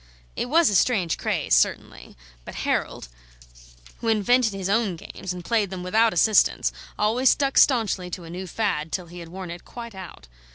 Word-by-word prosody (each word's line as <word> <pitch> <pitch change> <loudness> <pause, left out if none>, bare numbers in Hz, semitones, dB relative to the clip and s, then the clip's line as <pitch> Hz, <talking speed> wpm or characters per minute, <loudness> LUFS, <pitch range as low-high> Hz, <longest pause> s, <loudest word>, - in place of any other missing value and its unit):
It 245 - -3
was 325 -3 +4
a - - 0
strange 185 -6 +2
craze, - - -1
certainly; - - 0 0.3
but - - -10
Harold, - - -2 0.9
who 230 - -5
invented 225 +2 +3
his 195 -2 -4
own 205 -2 +1
games 175 +2 -8
and 180 -1 -7
played 215 -2 +1
them 185 -1 -6
without 220 +5 +3
assistance, 215 -1 +3 0.3
always 235 +5 +2
stuck 275 -1 +1
staunchly 220 -8 +3
to 175 0 -7
a 165 - -10
new 185 +2 -6
fad, 165 -5 -2
till 180 +1 -3
he 175 +1 -11
had 170 -1 -10
worn 185 0 -7
it 175 - -9
quite 235 -2 -9
out. 185 - -11
195 Hz, 180 wpm, -24 LUFS, 180-230 Hz, 0.9 s, was